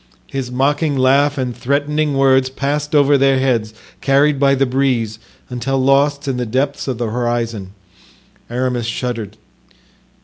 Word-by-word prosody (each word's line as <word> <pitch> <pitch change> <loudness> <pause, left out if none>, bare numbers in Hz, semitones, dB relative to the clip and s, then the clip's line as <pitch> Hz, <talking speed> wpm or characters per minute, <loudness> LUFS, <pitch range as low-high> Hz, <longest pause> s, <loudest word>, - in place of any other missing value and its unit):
His 135 -2 -5
mocking 145 +3 0
laugh 140 +3 +3
and 125 -3 -2
threatening 145 +2 -1
words 135 -1 +3
passed 145 +3 -2
over 145 -1 +4
their 135 0 +3
heads, 120 -5 0 0.3
carried 140 +1 +2
by 140 0 +4
the 135 0 +2
breeze, 125 -4 -1 0.3
until 125 +2 -2
lost 140 +2 +2
in 130 -2 -1
the 125 - -2
depths 135 +6 -1
of 130 -3 -2
the 120 -1 -2
horizon. 115 -5 -2 0.8
Aramis 125 -1 -2
shuddered. 115 -3 -4
135 Hz, 140 wpm, -17 LUFS, 120-140 Hz, 0.8 s, over